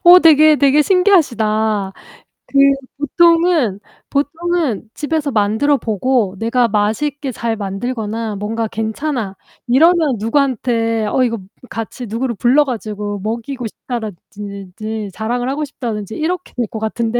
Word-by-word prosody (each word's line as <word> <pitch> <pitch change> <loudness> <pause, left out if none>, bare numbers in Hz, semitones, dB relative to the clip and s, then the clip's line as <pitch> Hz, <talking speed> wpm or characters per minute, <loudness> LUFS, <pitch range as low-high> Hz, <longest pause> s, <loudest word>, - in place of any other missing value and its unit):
어 355 +1 +10
되게 310 -1 +6
되게 285 +2 +4
신기하시다. 220 - +2 0.6
그 275 - -2 0.4
보통은 330 - +3 0.3
보통은 300 - -1
집에서 300 -1 -2
만들어 220 +7 +2
보고 225 -2 0
내가 235 +2 +2
맛있게 255 +7 -1
잘 230 -1 -2
만들거나 220 +1 -3
뭔가 220 +3 -2
괜찮아. 220 -1 -3 0.3
이러면 310 0 +4
누구한테 230 -2 0
어 255 - +2
이거 230 -2 -1 0.3
같이 230 +2 -6
누구를 235 +2 -2
불러 260 +8 +4
가지고 210 -5 -4
먹이고 235 +4 -4
싶다라 225 -1 -5 0.2
든 200 -3 -8
지 215 -2 -4
자랑을 245 +4 -2
하고 300 +2 -2
싶다든지 220 -6 -5
이렇게 355 +3 -3
될 245 - +1
것 220 - -6
같은데. 225 +2 -1
235 Hz, 295 characters per minute, -17 LUFS, 215-285 Hz, 0.6 s, 어